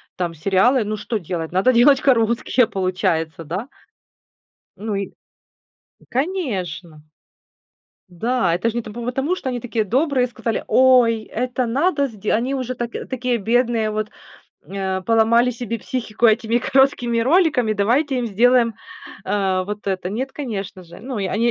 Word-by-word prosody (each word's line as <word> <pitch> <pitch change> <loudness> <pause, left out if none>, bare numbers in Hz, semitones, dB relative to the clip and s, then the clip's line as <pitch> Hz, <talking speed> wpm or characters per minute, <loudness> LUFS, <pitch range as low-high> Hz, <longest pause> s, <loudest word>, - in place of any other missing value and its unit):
там 175 -2 -2
сериалы, 195 - +2
ну 215 +1 -3
что 220 +2 -3
делать, 170 -3 -5
надо 190 +8 +3
делать 260 +3 +5
короткие 235 -1 +2
получается, 170 -4 -1
да? 185 - -5 1.1
Ну 210 0 -3
и, 195 -1 -3 1.0
конечно. 190 - -3 1.1
Да, 190 0 0
это 185 +7 0
ж - - -5
не 235 - -2
по 215 - -10
потому, 270 +8 -1
что 265 - -4
они 245 -1 -3
такие 230 -2 -2
добрые, 260 - +1
сказали: 235 -1 -3
"Ой, 245 -4 +4
это 250 +3 -2
надо 280 +4 +1
сде". 215 -4 -4
Они 245 +5 0
уже 255 -2 -3
так 240 0 -4 0.2
такие 250 -2 -1
бедные, 230 0 +1
вот, 215 0 -3 0.6
э, 190 -1 -3
поломали 230 +3 +3
себе 230 -1 -5
психику 235 -1 -1
этими 225 +1 +2
короткими 245 -3 +2
роликами, 275 - +3
давайте 250 +7 +1
им 240 - -1
сделаем, 235 +2 +3 0.5
э, 190 -2 0
вот 210 0 -6
это. 185 -2 -2
Нет, 260 +6 -3
конечно 200 -9 -6
же. 170 +1 -13
Ну, 245 0 -5
и 195 - -1
они 215 +5 0
230 Hz, 150 wpm, -21 LUFS, 195-255 Hz, 1.1 s, делать